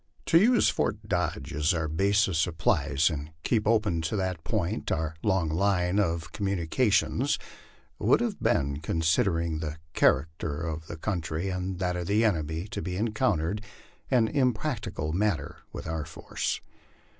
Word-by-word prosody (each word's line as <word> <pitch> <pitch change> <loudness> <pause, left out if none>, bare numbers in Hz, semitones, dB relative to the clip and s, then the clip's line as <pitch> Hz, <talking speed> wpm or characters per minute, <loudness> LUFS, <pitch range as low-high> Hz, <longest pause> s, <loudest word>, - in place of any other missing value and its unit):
To 165 - +6
use 240 +5 +5
Fort - - -1
Dodge - - -1
as 75 +3 +2
our 80 -1 -1
base 100 +7 +2
of 95 - -2
supplies, 80 -2 +2
and 75 -1 -4
keep 110 -4 +1
open 110 -7 +2
to 80 +6 -2
that 95 -4 -2
point 105 +2 -1
our 80 -1 -1
long 95 -5 +1
line 90 +3 +1
of 85 -4 0
communications, 100 - +1 0.6
would - - +4
have 235 -4 -2
been, 70 0 +1
considering 80 +1 +1
the 80 0 -4 0.2
character 75 +1 +1
of 80 -1 -4
the 80 - -6
country 85 -1 -2
and 90 0 -3
that 90 -1 -1
of 90 -1 -3
the 105 +3 +3
enemy 80 -4 0
to - - -4
be 90 -1 -3
encountered, 105 -4 0 0.5
an 120 -4 +4
impracticable 110 - -1
matter 95 -6 0
with - - -7
our 80 -1 -3
force. - - -3
90 Hz, 150 wpm, -28 LUFS, 80-105 Hz, 0.6 s, To